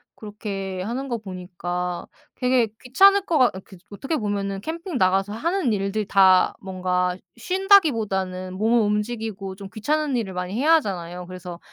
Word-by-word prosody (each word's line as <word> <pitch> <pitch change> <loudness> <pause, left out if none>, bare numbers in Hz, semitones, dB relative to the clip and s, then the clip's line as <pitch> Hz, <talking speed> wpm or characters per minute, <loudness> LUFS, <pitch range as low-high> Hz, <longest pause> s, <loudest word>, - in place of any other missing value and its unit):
그렇게 195 -3 -5
하는 245 +7 -4
거 240 -3 -2
보니까 180 -3 -5 0.3
되게 250 -2 +2 0.2
귀찮을 390 +11 +5
거 325 -5 +1
같 250 -6 +4
아 - - -5
그리고 190 +2 -14
어떻게 275 +9 -3
보면은 200 -5 -2
캠핑 335 - -4
나가서 195 +2 +2
하는 320 - 0
일들 200 +1 -1
다 190 -2 +5
뭔가 180 -1 -1 0.2
쉰다기보다는 225 - +2
몸을 220 +5 +2
움직이고 210 -2 -2
좀 195 0 -9
귀찮은 295 +5 0
일을 205 -5 -3
많이 180 +1 -4
해야 285 +9 +3
하잖아요. 180 - -3
그래서 180 -1 -8
205 Hz, 345 characters per minute, -23 LUFS, 185-250 Hz, 0.3 s, 귀찮을